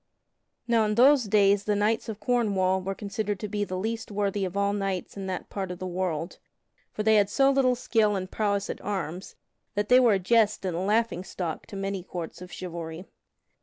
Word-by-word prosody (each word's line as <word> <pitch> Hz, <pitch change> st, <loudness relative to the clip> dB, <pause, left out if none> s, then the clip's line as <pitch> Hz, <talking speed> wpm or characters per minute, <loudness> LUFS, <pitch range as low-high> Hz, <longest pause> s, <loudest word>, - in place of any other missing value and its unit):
Now 230 Hz, -2 st, +3 dB
in 210 Hz, 0 st, 0 dB
those 260 Hz, +1 st, +6 dB
days 200 Hz, -1 st, +3 dB
the 210 Hz, -, +1 dB
knights 215 Hz, +3 st, 0 dB
of 215 Hz, -1 st, -5 dB
Cornwall 205 Hz, -5 st, +1 dB
were 195 Hz, +1 st, -3 dB
considered 205 Hz, 0 st, -3 dB
to 210 Hz, -, -3 dB
be 205 Hz, 0 st, -2 dB
the 185 Hz, -2 st, -4 dB
least 225 Hz, +4 st, -3 dB
worthy 200 Hz, -1 st, -1 dB
of 185 Hz, +1 st, -5 dB
all 200 Hz, 0 st, +1 dB
knights 195 Hz, -3 st, -3 dB
in 195 Hz, -1 st, -5 dB
that 185 Hz, -1 st, -4 dB
part 195 Hz, -2 st, -3 dB
of 180 Hz, -, -5 dB
the 185 Hz, -, -6 dB
world, 175 Hz, -2 st, -3 dB, 0.5 s
for 215 Hz, -, -3 dB
they 220 Hz, 0 st, +5 dB
had 200 Hz, -1 st, +3 dB
so 270 Hz, +5 st, +4 dB
little 260 Hz, -2 st, +3 dB
skill 220 Hz, -4 st, +1 dB
and 185 Hz, -1 st, -4 dB
prowess 200 Hz, -2 st, 0 dB
at -, -, -6 dB
arms 185 Hz, -3 st, -4 dB, 0.4 s
that 205 Hz, 0 st, -1 dB
they 250 Hz, +1 st, +7 dB
were 240 Hz, -4 st, +5 dB
a -, -, +3 dB
jest 215 Hz, +1 st, +2 dB
and 180 Hz, -3 st, -1 dB
a -, -, -2 dB
laughing 210 Hz, -1 st, +1 dB
stock 175 Hz, -4 st, -5 dB
to -, -, -9 dB
many 195 Hz, -1 st, -3 dB
courts 175 Hz, -1 st, -7 dB
of 180 Hz, -1 st, -9 dB
chivalry. 170 Hz, -1 st, -6 dB
200 Hz, 210 wpm, -27 LUFS, 185-215 Hz, 0.5 s, they